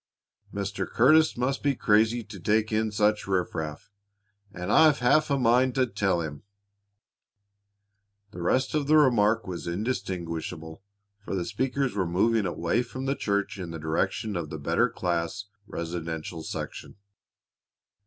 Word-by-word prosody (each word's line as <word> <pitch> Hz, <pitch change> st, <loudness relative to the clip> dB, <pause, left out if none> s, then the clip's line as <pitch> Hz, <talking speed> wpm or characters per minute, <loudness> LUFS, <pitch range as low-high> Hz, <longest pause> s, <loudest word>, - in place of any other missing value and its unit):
Mr. 100 Hz, 0 st, -3 dB
Curtis 155 Hz, +6 st, +4 dB
must 130 Hz, +3 st, -1 dB
be 140 Hz, -1 st, +1 dB
crazy 110 Hz, +2 st, +2 dB
to 105 Hz, -2 st, -10 dB
take 110 Hz, +5 st, +1 dB
in 110 Hz, 0 st, 0 dB
such 105 Hz, 0 st, +1 dB
riffraff, 85 Hz, -3 st, -3 dB, 0.6 s
and 90 Hz, 0 st, -4 dB
I've 155 Hz, +1 st, +6 dB
half 140 Hz, +6 st, +3 dB
a 140 Hz, -, +2 dB
mind 125 Hz, +1 st, +3 dB
to 130 Hz, -1 st, +3 dB
tell 95 Hz, -7 st, 0 dB
him 75 Hz, -3 st, -6 dB, 1.0 s
" 100 Hz, 0 st, -49 dB
The 85 Hz, -, -8 dB
rest 130 Hz, +9 st, +1 dB
of 150 Hz, -2 st, 0 dB
the 155 Hz, +1 st, +5 dB
remark 115 Hz, -6 st, +3 dB
was 90 Hz, -2 st, -6 dB
indistinguishable, 85 Hz, -5 st, -4 dB, 0.4 s
for 100 Hz, -, -4 dB
the 90 Hz, -2 st, -2 dB
speakers 130 Hz, +3 st, -1 dB
were 95 Hz, -3 st, -1 dB
moving 105 Hz, +4 st, +2 dB
away 85 Hz, +6 st, 0 dB
from 130 Hz, +1 st, -6 dB
the 135 Hz, -, +1 dB
church 100 Hz, -3 st, -1 dB
in 90 Hz, -2 st, -5 dB
the 85 Hz, -, -6 dB
direction 95 Hz, +6 st, -1 dB
of 85 Hz, -3 st, -3 dB
the 80 Hz, -, -5 dB
better 70 Hz, -, +1 dB
class, 85 Hz, +3 st, -2 dB, 0.2 s
residential 85 Hz, -1 st, -5 dB
section. -, -, -6 dB
100 Hz, 145 wpm, -27 LUFS, 85-120 Hz, 1.0 s, I've